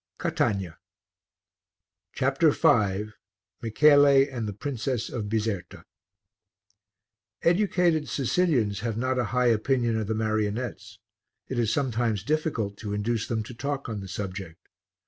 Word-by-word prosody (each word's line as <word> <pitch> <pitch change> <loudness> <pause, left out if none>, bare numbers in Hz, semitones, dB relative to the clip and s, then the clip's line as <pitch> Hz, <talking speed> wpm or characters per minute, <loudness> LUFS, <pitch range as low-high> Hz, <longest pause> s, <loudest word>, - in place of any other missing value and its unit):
CATANIA 95 -7 -1 1.3
CHAPTER - - +2
V 105 +1 +2 0.5
MICHELE 140 +3 +5
AND 120 -4 -3
THE 105 - -4
PRINCESS 125 +1 -3
OF 110 -5 -4
BIZERTA 105 -4 -3 1.6
Educated 175 -3 +2
Sicilians 130 - +1
have 110 -1 -3
not 130 +2 0
a 120 - +1
high 125 +3 +2
opinion 115 0 +1
of 110 - -3
the 110 - -1
marionettes; 110 +2 -2 0.5
it 130 - -3
is 115 -2 +1
sometimes 120 -7 0
difficult 135 -8 -1
to 105 -1 -5
induce 110 +2 -1
them 110 -2 -1
to 115 - -10
talk 140 +3 -4
on 110 -3 -4
the 95 - -7
subject. 95 -3 -6
115 Hz, 125 wpm, -26 LUFS, 105-135 Hz, 1.6 s, MICHELE